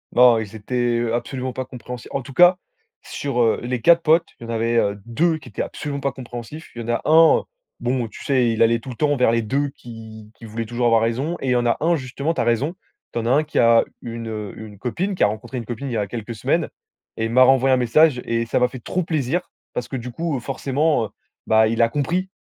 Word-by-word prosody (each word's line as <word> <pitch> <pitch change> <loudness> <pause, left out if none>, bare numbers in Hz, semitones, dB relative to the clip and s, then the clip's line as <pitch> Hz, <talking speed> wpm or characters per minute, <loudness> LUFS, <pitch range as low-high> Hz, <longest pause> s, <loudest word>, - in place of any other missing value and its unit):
Oh, 125 -1 +7
ils 110 0 -8
étaient, 120 +2 0
heu, 115 -1 -1
absolument 125 +2 -3
pas 130 - -3
compréhens 125 0 -8 0.2
en 140 - -2
tout 135 +1 -11
cas, 175 +4 +6 0.4
sur, 140 -3 -4
heu, 115 -2 +2
les 125 0 -2
4 170 +7 +6
potes, 165 +1 +3
il - - -11
y 115 - -7
en - - -2
avait, 115 +1 0
heu, 100 -2 +1
2 160 +8 +1
qui - - -14
étaient - - -4
absolument 140 -2 -4
pas 140 - 0
compréhensifs. 125 +4 -9
Il 120 - -5
y - - -5
en - - -6
a 120 - -1
1, 160 +1 +6 0.4
bon, 120 -2 -1
tu - - -12
sais, 125 -4 +2
il 115 - -2
allait 115 +1 +4
tout 125 - -10
le 125 - -6
temps 145 +3 +1
vers 125 -3 +3
les 115 0 +2
2 140 +6 -1
qui 110 -4 -11
qui - - -18
voulaient 115 +1 -5
toujours 120 +2 -2
avoir 115 -1 +4
raison 135 +10 -1
et 135 - -4
il - - +2
y - - +3
en 120 0 +1
a 120 - +2
1 170 +2 +2
justement, 140 +2 -3
tu - - -1
as - - +2
raison, 120 +9 0 0.4
tu - - -1
en 115 - -4
as - - 0
1 145 +5 +4
qui 155 - -5
a 115 -1 +5 0.2
une, 115 -1 -6
heu, 105 -3 -5
une 105 -2 -10
copine, 175 - -2
qui - - +1
a - - +6
rencontré 110 +5 -5
une 120 - -5
copine, 120 +4 -5
il - - -4
y 115 - 0
a 105 - -1
quelques 115 +2 -6
semaines 105 - 0 0.5
et 110 - -3
il 115 - -3
m'a 130 +2 +6
renvoyé 135 0 +4
un - - +4
message 125 +2 +3
et 115 0 0
ça 115 - 0
m'a 125 - +4
fait 130 +1 -9
trop 185 - -1
plaisir, 160 +1 -1 0.2
parce 125 - -3
que, - - -6
du 125 -1 -5
coup, 160 0 -2
forcément, 135 0 0
heu, - - -9 0.4
bah, 110 0 +5
il 115 +1 0
a 115 - +5
compris, 170 +9 -1
125 Hz, 265 wpm, -22 LUFS, 115-140 Hz, 0.5 s, Oh